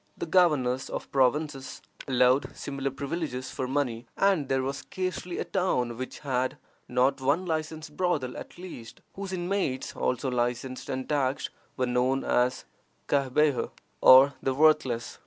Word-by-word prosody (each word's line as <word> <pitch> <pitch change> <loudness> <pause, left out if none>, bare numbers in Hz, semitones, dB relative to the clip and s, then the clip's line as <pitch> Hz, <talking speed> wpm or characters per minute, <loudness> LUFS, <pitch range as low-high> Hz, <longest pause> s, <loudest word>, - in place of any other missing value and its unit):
The - - -3
governors 150 -8 +2
of - - -6
provinces 135 +1 0 0.3
allowed 130 +1 +3
similar 140 -1 -3
privileges 135 -2 -4
for 130 -2 -3
money, 125 -4 -1
and 190 -8 +2
there 135 -1 +1
was 135 +1 -2
scarcely 185 -1 -4
a - - -1
town 125 -11 0
which 130 +2 -7
had 130 -1 -1 0.3
not 130 +2 +2
one 145 +8 +1
licensed 155 -2 -4
brothel 145 -9 0
at - - -9
least, 175 -11 -10
whose 195 -1 -6
inmates 180 -7 -2
(also 125 +1 -1
licensed 125 +1 -2
and 130 0 -3
taxed) 140 -2 0 0.3
were 130 - +1
known 125 +2 +1
as 125 +1 +1 0.4
Cahbeha, 140 0 +2 0.3
or 135 +2 +8
the 135 -1 0
worthless. 140 -6 +2
135 Hz, 140 wpm, -28 LUFS, 130-155 Hz, 0.4 s, or